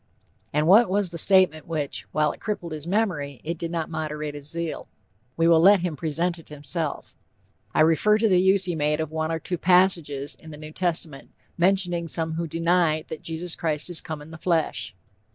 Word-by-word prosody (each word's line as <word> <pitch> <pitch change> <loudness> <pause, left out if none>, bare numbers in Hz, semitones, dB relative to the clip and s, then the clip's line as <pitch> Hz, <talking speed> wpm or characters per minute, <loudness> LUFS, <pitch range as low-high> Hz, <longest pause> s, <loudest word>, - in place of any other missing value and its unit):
And 150 +1 +1
what 200 +5 +6
was 195 -2 0
the 170 - -3
statement 185 -4 +4
which, 155 -4 -3
while 150 -1 +1
it - - -12
crippled 190 -6 -4
his 155 0 -6
memory, 175 - -1
it 170 +3 -3
did 170 - -3
not 165 -2 -2
moderate 155 -2 -4
his 145 0 -6
zeal? 170 -1 -4 0.5
We 165 0 +3
will 165 -1 +6
let 195 +2 +6
him 175 -3 -2
present 165 +3 -2
it 165 - -16
himself; 150 +1 -5 0.6
"I - - +4
refer 165 +7 +4
to 220 +1 +2
the 185 -3 +4
use 190 0 +4
he 180 - -1
made 150 0 0
of 160 -1 -3
one 160 0 -2
or 165 - -1
two 170 +2 -4
passages 170 -6 +2
in 160 - -14
the 150 - -9
New 155 0 -9
Testament, 165 -5 -3 0.3
mentioning 175 -2 +1
some 160 0 -1
who 165 +1 -3
deny 165 -1 +1
'that 160 - -6
Jesus 165 +1 -3
Christ 155 +1 -2
is 170 - -2
come 155 -2 -7
in 155 - -14
the 160 - -10
flesh.' 160 - -1
165 Hz, 205 wpm, -24 LUFS, 155-180 Hz, 0.6 s, what